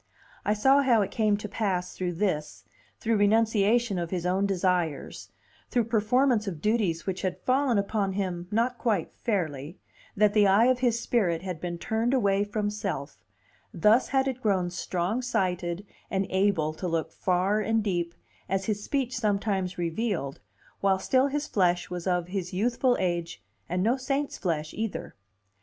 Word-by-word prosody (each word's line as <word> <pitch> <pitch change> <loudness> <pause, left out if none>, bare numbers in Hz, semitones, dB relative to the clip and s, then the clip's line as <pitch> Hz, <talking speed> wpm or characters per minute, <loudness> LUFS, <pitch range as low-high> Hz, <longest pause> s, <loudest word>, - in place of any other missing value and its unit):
I 210 - +1
saw 270 +6 +5
how 240 -6 +4
it - - -5
came 215 -3 +2
to 210 - -6
pass 195 -4 -2
through 180 -1 -2
this, 165 -5 -2 0.3
through 225 -2 +1
renunciation 220 0 +3
of 170 -1 -3
his 180 -1 -3
own 190 +2 +1
desires, 180 -5 -1 0.4
through 240 - +2
performance 225 +1 +3
of 170 -6 -4
duties 205 -4 0
which 185 -1 -3
had 185 -2 -2
fallen 260 -2 +2
upon 200 -1 0
him 180 -3 -3
not 235 +3 0
quite 210 -8 0
fairly, 160 - -2 0.4
that 210 0 +4
the 210 -2 +5
eye 200 +4 +5
of 255 0 +3
his 240 -2 +2
spirit 185 -9 0
had 180 -4 -5
been 175 -1 -3
turned 225 +7 0
away 200 -5 +2
from 205 0 -2
self; 195 -10 -4 0.5
thus 210 +8 +4
had 270 0 +1
it 260 -1 -3
grown 190 -5 +1
strong 180 +5 -2
sighted 185 -6 -1 0.2
and 195 0 0
able 190 -5 +2
to 180 +3 -4
look 165 -1 -1
far 185 +5 +1
and 220 +1 +1
deep, 175 -4 -1 0.3
as 195 +1 0
his 210 -1 -2
speech 260 -1 -1
sometimes 200 -4 -1
revealed, 170 - -2 0.4
while 195 -1 +3
still 260 +7 +2
his 295 +1 -2
flesh 180 -3 +1
was 180 0 -4
of 180 -1 0
his 185 -2 -4
youthful 245 +5 +2
age, 170 - -2 0.3
and 180 +1 0
no 235 +5 +2
saint's 275 +2 -2
flesh 155 -5 -2
either. 220 -1 -4
200 Hz, 165 wpm, -27 LUFS, 180-225 Hz, 0.5 s, saw